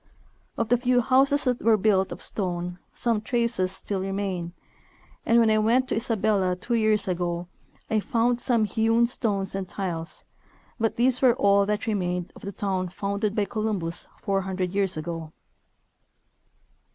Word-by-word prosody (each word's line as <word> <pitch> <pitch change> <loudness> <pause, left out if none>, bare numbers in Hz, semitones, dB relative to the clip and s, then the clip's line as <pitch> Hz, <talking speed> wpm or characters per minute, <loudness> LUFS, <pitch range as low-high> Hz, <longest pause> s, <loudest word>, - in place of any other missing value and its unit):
Of 230 -1 -1
the 245 0 +3
few 250 0 +3
houses 270 +3 +3
that 250 -2 0
were 225 -1 +4
built 190 -2 +2
of - - -6
stone 180 -2 -3
some 230 -3 0
traces 235 -6 0
still 190 0 -3
remain, 190 -3 -3 0.8
and 230 - +5
when 225 -1 +4
I 215 - +3
went 240 +4 +2
to - - 0
Isabella 210 -5 +1
two 210 +7 -4
years 215 -3 +2
ago 175 -1 -2 0.4
I 220 - +1
found 235 +3 +1
some 235 -4 +2
hewn 225 +2 +2
stones 205 -5 -1
and 195 -2 -4
tiles, 170 -4 -3 0.5
but 225 -1 0
these 250 +1 +2
were 250 -3 +5
all 200 -3 +3
that 210 0 -1
remained 180 -4 -2
of - - -13
the 200 - -5
town 190 -2 -2
founded 200 +3 -2
by 210 - +1
Columbus 205 -7 -2
four 195 -1 0
hundred 185 -1 -3
3^ears 195 -3 0
ago. 160 0 -5
205 Hz, 160 wpm, -25 LUFS, 185-230 Hz, 0.8 s, and